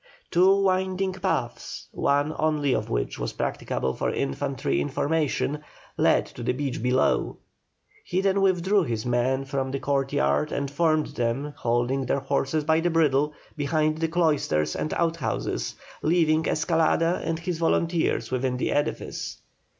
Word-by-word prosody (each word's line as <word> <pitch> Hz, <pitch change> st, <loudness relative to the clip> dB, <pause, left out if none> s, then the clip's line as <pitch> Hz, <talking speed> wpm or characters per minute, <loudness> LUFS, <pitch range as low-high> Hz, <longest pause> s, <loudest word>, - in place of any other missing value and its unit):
Two 185 Hz, +3 st, +5 dB
winding 190 Hz, 0 st, +1 dB
paths, 190 Hz, -, -3 dB
one 145 Hz, +2 st, +1 dB
only 150 Hz, -3 st, +1 dB
of 110 Hz, -2 st, -1 dB
which -, -, -2 dB
was -, -, -3 dB
practicable 65 Hz, -, -2 dB
for -, -, -1 dB
infantry 70 Hz, 0 st, -1 dB
in -, -, -2 dB
formation, 150 Hz, -1 st, 0 dB, 0.4 s
led -, -, +3 dB
to -, -, -11 dB
the -, -, 0 dB
beach 135 Hz, -2 st, -3 dB
below. 125 Hz, +2 st, +1 dB, 0.7 s
He 180 Hz, -, -1 dB
then 195 Hz, 0 st, +2 dB
withdrew 190 Hz, +1 st, +3 dB
his 115 Hz, -9 st, -2 dB
men 125 Hz, +2 st, +1 dB
from 135 Hz, -1 st, -2 dB
the 135 Hz, -, -2 dB
courtyard 75 Hz, -, +1 dB
and 140 Hz, -1 st, -2 dB
formed 155 Hz, 0 st, +2 dB
them, 135 Hz, +2 st, -2 dB
holding 120 Hz, +3 st, 0 dB
their 140 Hz, -, 0 dB
horses 140 Hz, +2 st, 0 dB
by 160 Hz, +2 st, +3 dB
the 175 Hz, +1 st, +1 dB
bridle, 150 Hz, -3 st, +2 dB, 0.2 s
behind 155 Hz, +1 st, 0 dB
the 165 Hz, -, +1 dB
cloisters 150 Hz, -, +1 dB
and 155 Hz, -, -2 dB
outhouses, 165 Hz, -4 st, -1 dB, 0.3 s
leaving 160 Hz, -1 st, +2 dB
Escalada 165 Hz, +1 st, +2 dB
and 165 Hz, -, -1 dB
his 170 Hz, 0 st, -4 dB
volunteers 165 Hz, 0 st, +1 dB
within 130 Hz, 0 st, 0 dB
the -, -, -1 dB
edifice. 145 Hz, -, -2 dB
150 Hz, 145 wpm, -26 LUFS, 130-165 Hz, 0.7 s, Two